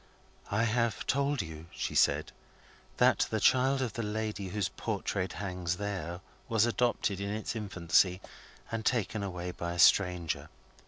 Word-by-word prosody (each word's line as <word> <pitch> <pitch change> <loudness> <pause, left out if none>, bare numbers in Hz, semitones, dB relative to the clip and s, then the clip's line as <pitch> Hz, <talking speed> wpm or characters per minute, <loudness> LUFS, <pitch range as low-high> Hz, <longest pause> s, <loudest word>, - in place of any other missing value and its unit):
"I 105 +3 +1
have 115 -1 0
told 140 -3 +1
you," 80 0 -9
she - - -3
said, 75 +2 +3 0.7
"that - - +4
the 110 - 0
child 130 +5 +3
of 115 -5 -3
the 115 - -3
lady 105 -2 -3
whose 100 0 -1
portrait 95 -1 -3
hangs 90 -3 -3
there, 95 -4 -4 0.3
was 115 -1 +4
adopted 120 -4 0
in 100 - -2
its 110 +3 -3
infancy, 90 -3 +2 0.5
and 115 -1 -2
taken 110 -3 0
away 90 -2 -4
by 85 0 -4
a - - -6
stranger. 85 -6 +3
100 Hz, 150 wpm, -31 LUFS, 90-115 Hz, 0.7 s, that